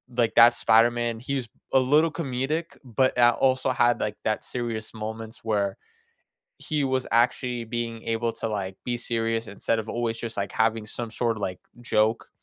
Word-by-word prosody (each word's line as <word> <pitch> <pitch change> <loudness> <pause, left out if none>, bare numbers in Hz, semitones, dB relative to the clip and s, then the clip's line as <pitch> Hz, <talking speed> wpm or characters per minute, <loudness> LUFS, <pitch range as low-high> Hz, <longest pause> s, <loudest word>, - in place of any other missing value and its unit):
like, 115 -2 +1
that 120 +1 +8
Spider-Man, 120 0 +3
he 135 +4 -3
was 125 -4 -3 0.2
a 135 - +6
little 150 +5 +3
comedic, 150 +2 -3
but, 130 0 +1
uh, 120 0 +5
also 130 0 +2
had, 120 -1 +3
like, 105 0 -2
that 110 -1 -1
serious 115 -3 -4
moments 110 +1 -6
where, 100 -3 0 0.8
he 150 -2 -1
was 130 -1 0
actually 120 0 +1
being 115 0 -4
able 115 0 -1
to, - - -4
like, 95 -3 -4
be 120 - -1
serious 115 -1 -1
instead 105 +3 -1
of 110 0 -4
always 115 -1 -2
just, 115 -2 -6
like, 100 - -3
having 110 -1 +1
some 115 +1 -6
sort 115 -2 0
of, 110 - -8
like, 90 -2 -3 0.2
joke. 110 -1 +1
115 Hz, 180 wpm, -26 LUFS, 110-125 Hz, 0.8 s, that